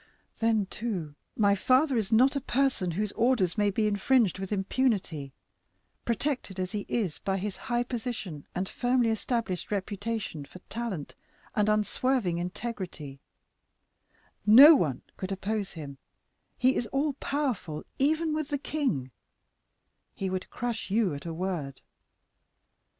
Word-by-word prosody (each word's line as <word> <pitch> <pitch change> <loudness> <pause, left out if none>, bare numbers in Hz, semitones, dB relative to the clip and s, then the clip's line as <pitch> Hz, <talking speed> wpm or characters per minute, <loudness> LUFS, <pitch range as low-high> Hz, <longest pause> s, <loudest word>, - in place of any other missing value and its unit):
Then, 225 -3 +2
too, 190 -8 -4 0.2
my 205 -2 +4
father 260 +7 +3
is 220 -3 0
not 255 +5 +5
a 280 - 0
person 255 -8 +1
whose 200 +5 -1
orders 230 -7 +2
may 205 -2 +2
be 215 +2 0
infringed 210 0 +2
with 195 0 -5
impunity; 195 - 0 0.7
protected 235 -4 -2
as 185 0 -2
he 205 -1 -4
is 195 -10 -1
by 195 -1 -1
his 195 +1 -3
high 240 -1 -1
position 230 - -5
and 185 +2 -1
firmly 245 0 +1
established 225 -4 -2
reputation 205 -4 -3
for 140 - -12
talent 220 -10 -4 0.4
and 210 0 +3
unswerving 215 -3 +1
integrity, 180 - -5 1.2
no 255 +10 +10
one 155 - +1
could 190 0 -4
oppose 200 +1 -2
him; 140 -4 -8 0.6
he 255 +1 +3
is 235 - -1
all 280 +4 0
powerful 255 - -2 0.2
even 310 +3 +2
with 310 -1 -1
the 290 - -1
king; 265 - -2 1.0
he 190 -1 -2
would 185 0 -3
crush 240 -3 -3
you 200 -4 +2
at 140 +4 -7
a - - -3
word. 165 -7 -3
210 Hz, 135 wpm, -29 LUFS, 185-245 Hz, 1.2 s, no